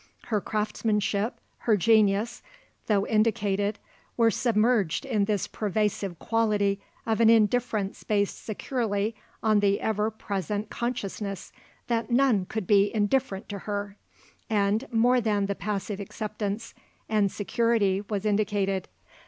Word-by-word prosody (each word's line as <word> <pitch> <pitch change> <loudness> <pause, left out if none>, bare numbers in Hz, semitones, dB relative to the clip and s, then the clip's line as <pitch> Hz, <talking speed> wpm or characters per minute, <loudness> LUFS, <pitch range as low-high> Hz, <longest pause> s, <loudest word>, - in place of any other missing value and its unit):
Her 210 - +2
craftsmanship, 210 0 -1 0.2
her 220 -3 +2
genius, 215 +2 +3 0.5
though 205 -2 +2
indicated, 210 -2 +1 0.4
were 230 -1 +4
submerged 220 -5 +1
in 220 -7 +1
this 205 -2 0
pervasive 205 -3 -1
quality 205 +2 +1 0.2
of 225 0 +1
an 225 - +6
indifference 220 -2 +2
based 205 -2 0
securely 215 -2 -2 0.3
on 215 -2 +4
the 200 0 +2
ever 215 0 0
present 205 -1 -4
consciousness 210 -5 -4 0.3
that 230 -2 -1
none 240 -6 +3
could 220 -3 -3
be 200 +1 +4
indifferent 215 -1 0
to 200 -1 -5
her. 200 -1 -3 0.5
And 210 +3 +1
more 245 +2 +4
than 210 -3 +1
the 200 - -1
passive 200 +1 -3
acceptance 210 +2 -4 0.3
and 210 -3 +2
security 215 -3 +1
was 205 -1 -2
indicated. 200 -2 0
210 Hz, 120 wpm, -27 LUFS, 200-225 Hz, 0.5 s, an